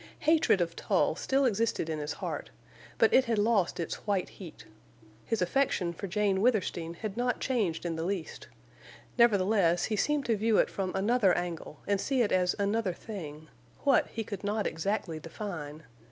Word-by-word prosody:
Hatred 310 Hz, -, +3 dB
of 170 Hz, -1 st, -1 dB
Tull -, -, +1 dB
still 270 Hz, +1 st, +1 dB
existed 225 Hz, -6 st, 0 dB
in 160 Hz, -1 st, -3 dB
his 150 Hz, +1 st, -3 dB
heart, -, -, -5 dB, 0.5 s
but -, -, +4 dB
it 260 Hz, -, +6 dB
had 230 Hz, -2 st, 0 dB
lost 205 Hz, -5 st, +2 dB
its 170 Hz, -, -5 dB
white 195 Hz, -3 st, 0 dB
heat. 180 Hz, -5 st, -11 dB, 0.6 s
His 225 Hz, -5 st, 0 dB
affection 180 Hz, -4 st, 0 dB
for 200 Hz, -, -6 dB
Jane 195 Hz, 0 st, +1 dB
Withersteen 185 Hz, -8 st, 0 dB
had 210 Hz, +2 st, -5 dB
not 245 Hz, +1 st, 0 dB
changed 210 Hz, -12 st, -1 dB
in 165 Hz, -1 st, -2 dB
the 160 Hz, -, -2 dB
least; 175 Hz, -, -4 dB, 0.7 s
nevertheless, 195 Hz, -6 st, +4 dB
he 215 Hz, -, 0 dB
seemed 290 Hz, +5 st, 0 dB
to 230 Hz, -, +2 dB
view 220 Hz, +1 st, +2 dB
it -, -, +3 dB
from 190 Hz, -2 st, -2 dB
another 200 Hz, 0 st, +3 dB
angle 170 Hz, -4 st, -5 dB
and 200 Hz, -1 st, 0 dB
see 265 Hz, -3 st, +1 dB
it 210 Hz, -, -1 dB
as 180 Hz, -1 st, +2 dB
another 200 Hz, -1 st, 0 dB
thing—what, 170 Hz, -, -2 dB
he 225 Hz, -, -4 dB
could 205 Hz, -2 st, -7 dB
not 205 Hz, +1 st, -1 dB
exactly 165 Hz, -1 st, -2 dB
define. 160 Hz, -3 st, -7 dB
200 Hz, 170 wpm, -30 LUFS, 175-225 Hz, 0.7 s, it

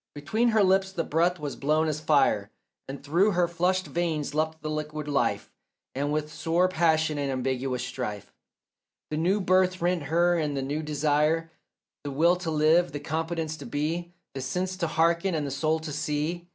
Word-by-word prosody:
Between 215 Hz, +12 st, 0 dB
her 220 Hz, -3 st, +4 dB
lips 190 Hz, 0 st, +3 dB
the 175 Hz, -3 st, -2 dB
breath 170 Hz, +4 st, +1 dB
was 145 Hz, -3 st, -5 dB
blown 155 Hz, +3 st, +1 dB
as 155 Hz, -1 st, -1 dB
fire, 140 Hz, -9 st, +2 dB, 0.4 s
And 140 Hz, +1 st, -7 dB
through 175 Hz, +8 st, +2 dB
her 175 Hz, 0 st, +2 dB
flushed 180 Hz, +2 st, 0 dB
veins 155 Hz, -1 st, -2 dB
leapt 160 Hz, +1 st, -1 dB
the 155 Hz, -, -3 dB
liquid 150 Hz, 0 st, -4 dB
life, 145 Hz, -1 st, 0 dB, 0.4 s
And 145 Hz, +2 st, -1 dB
with 150 Hz, 0 st, -2 dB
sore 170 Hz, +3 st, +1 dB
passion 160 Hz, -3 st, +1 dB
and 140 Hz, -1 st, -1 dB
ambiguous 130 Hz, -1 st, -2 dB
strife 115 Hz, -5 st, -5 dB, 0.8 s
The 155 Hz, -, -1 dB
new 185 Hz, +6 st, +2 dB
birth 185 Hz, -1 st, +2 dB
rent 175 Hz, 0 st, +1 dB
her 170 Hz, +3 st, +2 dB
and 150 Hz, -3 st, -1 dB
the 135 Hz, -, -1 dB
new 145 Hz, +3 st, -2 dB
desire, 150 Hz, +2 st, +1 dB, 0.5 s
The 145 Hz, -, -4 dB
will 165 Hz, +6 st, +3 dB
to 180 Hz, -2 st, -4 dB
live, 160 Hz, +3 st, +3 dB
the 145 Hz, -, -3 dB
competence 160 Hz, +1 st, -3 dB
to -, -, -9 dB
be, 165 Hz, +4 st, -2 dB, 0.2 s
The 135 Hz, -, -5 dB
sense 180 Hz, +8 st, -2 dB
to 170 Hz, -3 st, -1 dB
hearken 170 Hz, +3 st, +1 dB
and 150 Hz, -2 st, -1 dB
the 140 Hz, -, -4 dB
soul 155 Hz, +4 st, +1 dB
to 160 Hz, -1 st, -6 dB
see. 150 Hz, +3 st, -2 dB
155 Hz, 185 wpm, -27 LUFS, 145-175 Hz, 0.8 s, her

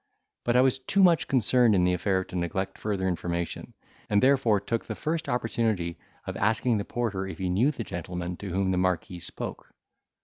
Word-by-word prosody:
But 120 Hz, -, +2 dB
I 125 Hz, -, +7 dB
was 130 Hz, 0 st, +2 dB
too 195 Hz, +9 st, +2 dB
much 170 Hz, -4 st, +4 dB
concerned 125 Hz, -3 st, +4 dB
in 90 Hz, -, +3 dB
the 90 Hz, 0 st, +3 dB
affair 95 Hz, +1 st, +1 dB
to 95 Hz, -, -11 dB
neglect 95 Hz, +2 st, -2 dB
further 100 Hz, -3 st, -1 dB
information, 85 Hz, -1 st, -3 dB, 0.3 s
and 105 Hz, -, +4 dB
therefore 130 Hz, -4 st, +4 dB
took 115 Hz, +3 st, -3 dB
the -, -, -5 dB
first 160 Hz, +1 st, -2 dB
opportunity 110 Hz, -7 st, -1 dB, 0.3 s
of -, -, -5 dB
asking 110 Hz, +2 st, +2 dB
the 100 Hz, -, -3 dB
porter 105 Hz, -6 st, -2 dB
if 95 Hz, -, -7 dB
he 95 Hz, -2 st, -2 dB
knew 110 Hz, +10 st, +3 dB
the 135 Hz, -6 st, -4 dB
gentleman 90 Hz, -1 st, -5 dB
to 100 Hz, -, -6 dB
whom 95 Hz, +1 st, 0 dB
the 90 Hz, -, +1 dB
marquis 90 Hz, -1 st, -1 dB
spoke. -, -, -7 dB
100 Hz, 195 wpm, -27 LUFS, 90-120 Hz, 0.3 s, I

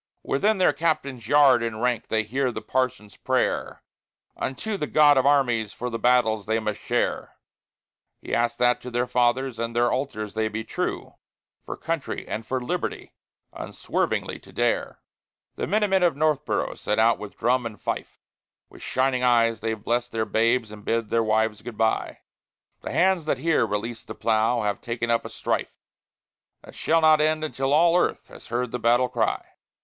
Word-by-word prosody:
Within 210 Hz, +10 st, +1 dB
their 180 Hz, -5 st, +4 dB
Captain's 140 Hz, -6 st, -2 dB
yard 140 Hz, -3 st, +5 dB
enranked 115 Hz, +1 st, -1 dB
they 110 Hz, 0 st, +1 dB
hear 130 Hz, +4 st, -1 dB
the -, -, -7 dB
Parson's 120 Hz, -6 st, -2 dB
prayer -, -, -1 dB, 0.5 s
Unto 205 Hz, +11 st, -3 dB
the 150 Hz, -6 st, -3 dB
God 145 Hz, -1 st, +5 dB
of 130 Hz, 0 st, +3 dB
armies 120 Hz, -7 st, +2 dB
for 125 Hz, +1 st, -5 dB
the 115 Hz, -, -3 dB
battles 110 Hz, -4 st, +2 dB
they 110 Hz, +1 st, +1 dB
must 105 Hz, -2 st, -3 dB
share; -, -, -2 dB, 0.8 s
He -, -, -7 dB
asks 120 Hz, 0 st, +1 dB
that 125 Hz, 0 st, +2 dB
to 125 Hz, -, -7 dB
their 120 Hz, 0 st, 0 dB
Fathers 125 Hz, 0 st, 0 dB
and 115 Hz, 0 st, -3 dB
their 120 Hz, 0 st, +3 dB
Altars 110 Hz, -6 st, -3 dB
they 110 Hz, 0 st, 0 dB
be 110 Hz, +1 st, -4 dB
true, -, -, -4 dB, 0.5 s
For -, -, -7 dB
Country 165 Hz, -3 st, -4 dB
and 110 Hz, 0 st, -5 dB
for 130 Hz, -, -1 dB
Liberty 175 Hz, +8 st, -4 dB, 0.4 s
unswervingly -, -, -3 dB
to -, -, -17 dB
dare. -, -, -1 dB, 0.5 s
The -, -, -3 dB
Minute 210 Hz, -1 st, +1 dB
Men 190 Hz, -1 st, +3 dB
of 175 Hz, -5 st, +3 dB
Northboro' 150 Hz, -1 st, 0 dB
set 105 Hz, -, -1 dB
out 115 Hz, +1 st, +4 dB
with 105 Hz, -1 st, -9 dB
drum 125 Hz, +1 st, +1 dB
and 105 Hz, -4 st, -11 dB
fife; -, -, -4 dB, 0.5 s
With -, -, -14 dB
shining 130 Hz, -1 st, 0 dB
eyes 115 Hz, -3 st, +3 dB
they've 110 Hz, -1 st, -3 dB
blest 120 Hz, +1 st, -1 dB
their 110 Hz, -1 st, -1 dB
babes 115 Hz, +1 st, +1 dB
and 105 Hz, -1 st, -11 dB
bid 115 Hz, -1 st, -1 dB
their 115 Hz, 0 st, +2 dB
wives 110 Hz, -1 st, +1 dB
good 120 Hz, -3 st, -9 dB
by. 110 Hz, 0 st, 0 dB, 0.6 s
The -, -, -6 dB
hands 185 Hz, -3 st, +2 dB
that 150 Hz, -, 0 dB
here 160 Hz, +4 st, +2 dB
release 115 Hz, +3 st, -4 dB
the -, -, -9 dB
plough 115 Hz, +1 st, +1 dB
have 105 Hz, -1 st, -2 dB
taken 120 Hz, 0 st, -2 dB
up 115 Hz, -, +1 dB
a -, -, -5 dB
strife -, -, -3 dB, 0.9 s
That -, -, -13 dB
shall 165 Hz, +1 st, +1 dB
not 155 Hz, -1 st, +5 dB
end 155 Hz, 0 st, +1 dB
until 135 Hz, -3 st, -2 dB
all 165 Hz, +3 st, +5 dB
earth 180 Hz, -, 0 dB
has -, -, -13 dB
heard 120 Hz, +1 st, -2 dB
the 125 Hz, -, -3 dB
battle 120 Hz, +2 st, +3 dB
cry. -, -, -1 dB
120 Hz, 180 wpm, -25 LUFS, 110-140 Hz, 0.9 s, yard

